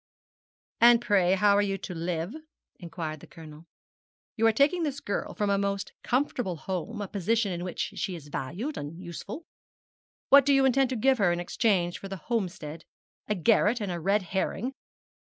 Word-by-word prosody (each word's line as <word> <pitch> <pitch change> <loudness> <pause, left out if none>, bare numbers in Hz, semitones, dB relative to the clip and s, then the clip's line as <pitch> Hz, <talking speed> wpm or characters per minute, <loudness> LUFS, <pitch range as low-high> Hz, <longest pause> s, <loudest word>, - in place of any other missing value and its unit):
'And 235 0 +7
pray 200 -6 +3
how 200 +1 +4
are 205 - +4
you 195 -1 -1
to 185 - -7
live?' 170 +2 -3 0.5
inquired 165 -3 -5
the - - -14
Colonel. 160 0 -13 0.7
'You 225 0 +3
are - - +6
taking 285 +10 +3
this 285 -4 -2
girl 200 - -4
from 205 -1 0
a 200 - +2
most 200 0 -2
comfortable 245 -7 -1
home 190 +7 -4
a - - -5
position 205 +2 0
in 175 0 -4
which 180 -1 -3
she 185 - -2
is 145 -3 -11
valued 185 - -4
and 145 +3 -7
useful. 190 - -7 0.8
What 280 0 +8
do 280 +1 +4
you 270 0 +4
intend 265 0 +3
to 260 - -2
give 260 +2 +3
her 190 -4 +4
in 175 - -1
exchange 175 -1 0
for 195 - -7
the 195 0 -6
Homestead? 170 -6 -4 0.4
A 210 - 0
garret 215 +4 +3
and 205 -4 -3
a 175 - -3
red 195 +4 +1
herring?' 190 +7 -2
200 Hz, 185 wpm, -28 LUFS, 175-230 Hz, 0.8 s, What